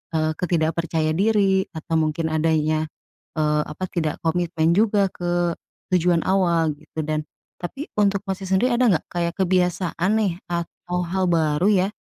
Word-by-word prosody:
eee, 155 0 +1
ke - - 0
tidak 160 -2 +2
percaya 160 -2 0
diri 195 +1 +2
atau 160 +1 -3
mungkin 160 +1 0
adanya, 155 0 +1 0.5
eee, 150 -1 +2
apa, 150 +5 -7
tidak 155 -3 -1
komitmen 165 -1 +1
juga 205 -1 +3
ke 175 0 -1 0.5
tujuan 175 -1 +3
awal 170 -4 +2
gitu 160 - -7
dan 155 0 -1 0.4
tapi 270 - -5
untuk 200 -1 +2
Masnya 190 0 -4
sendiri 245 +7 +2
ada 250 +1 +3
enggak 175 - +1
kayak 170 -1 -1
kebiasaan 180 -1 +1
nih 205 -5 +1 0.2
atau 175 +1 -3
hal 185 +2 0
baru 160 0 +2
ya 190 -2 +3
175 Hz, 155 wpm, -23 LUFS, 160-190 Hz, 0.5 s, juga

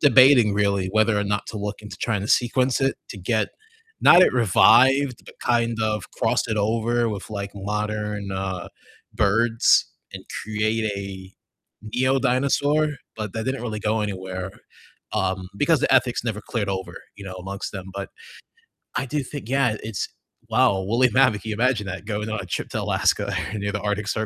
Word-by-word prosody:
debating 130 -5 +6
really 100 -2 +1
whether 110 0 +3
or 105 - 0
not 105 0 -2
to 110 - -7
look 105 +1 -4
into 105 -2 -9
trying 110 -4 -1
to 105 - -5
sequence 125 +2 +2
it 135 - +1
to - - -8
get 110 +4 0 0.5
not 175 - +7
it - - +5
revived, 130 +4 +5
but - - -14
kind 115 -1 +1
of 105 -3 -1
cross - - 0
it 110 -1 -1
over 115 +2 +1
with, 105 0 -6
like, 100 -1 -5
modern, 105 0 -3
uh, 95 -1 -4 0.5
birds 115 +3 +3 0.3
and - - -8 0.2
create 110 +1 -1
a 95 -1 -7 0.6
neo-dinosaur, 135 +4 +2 0.3
but 105 -3 -5
that 115 -1 -3
didn't 130 -2 -2
really 110 -3 -4
go 110 +1 0
anywhere, 95 -2 -4 0.6
um, 95 -2 -1
because 150 +6 +3
the - - +3
ethics 125 -3 +2
never 110 -3 -2
cleared 105 -4 -3
over, 95 -2 -3 0.2
you 100 - -11
know, 95 -1 -7
amongst 95 +2 -6
them, 95 -2 -7
but 100 - -5 0.9
I 135 - 0
do 145 +2 -2
think 130 -3 -8
yeah, 130 -5 +2
it's 110 -3 -3 0.4
wow, 125 +3 +4
a 95 - -3
woolly 120 +5 +3
mammoth. 130 -6 +3
Can 110 - -6
you 105 - -2
imagine 115 -2 +1
that? 95 +1 -6
Going 105 0 -3
on 110 -1 -2
a - - -6
trip - - -4
to - - -3
Alaska - - +1 0.2
or 105 - -3
near 100 0 -2
the 105 0 -3
Arctic 105 0 -2
Cir 110 +1 -1
110 Hz, 185 wpm, -23 LUFS, 100-120 Hz, 0.9 s, not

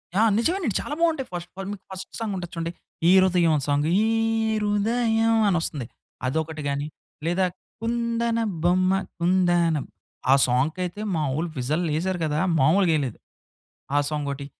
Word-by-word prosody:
ఆ! 205 - +4 0.2
నిజమే 330 +11 +1
అండి. 250 - -2
చాలా 295 - -5
బావుంటాయి 320 -6 +1
ఫస్ట్ 175 0 -5
పార్ట్ 195 0 -5
మీకు 205 -2 -8
ఫస్ట్ 190 0 -8
సాంగ్ 220 -3 -2
ఉంటది 175 -1 -6
చూడండి. 165 0 -3 0.4
ఈ - - +7
'హృదయం' 175 -4 +3
సాంగ్. 145 +1 +1
ఈ - - +3 0.6
హృదయం 225 +2 +2
అని 185 - +3
ఒస్తుంది. 140 -7 -3 0.4
అదొకటి 160 +2 -2
గాని 140 +1 -2 0.4
లేదా 175 +3 +2 0.4
కుందన 235 0 0 0.2
బొమ్మ 185 +2 +3 0.3
కుందన 175 -2 +3 0.6
ఆ - - +8
సాంగ్‌కయితే 165 +10 -1
మా 160 - 0
ఓళ్లు 165 +2 -2
విజిల్ 150 +7 0
ఎసారు 185 +2 -1
కదా! 150 0 0 0.2
మామూలుగా 165 +5 +4
ఎయలేదు. 130 -6 -3 0.8
ఆ - - +5
సాంగ్ 150 -2 -2
ఒకటి. 140 0 -6
175 Hz, 150 wpm, -24 LUFS, 155-210 Hz, 0.8 s, ఆ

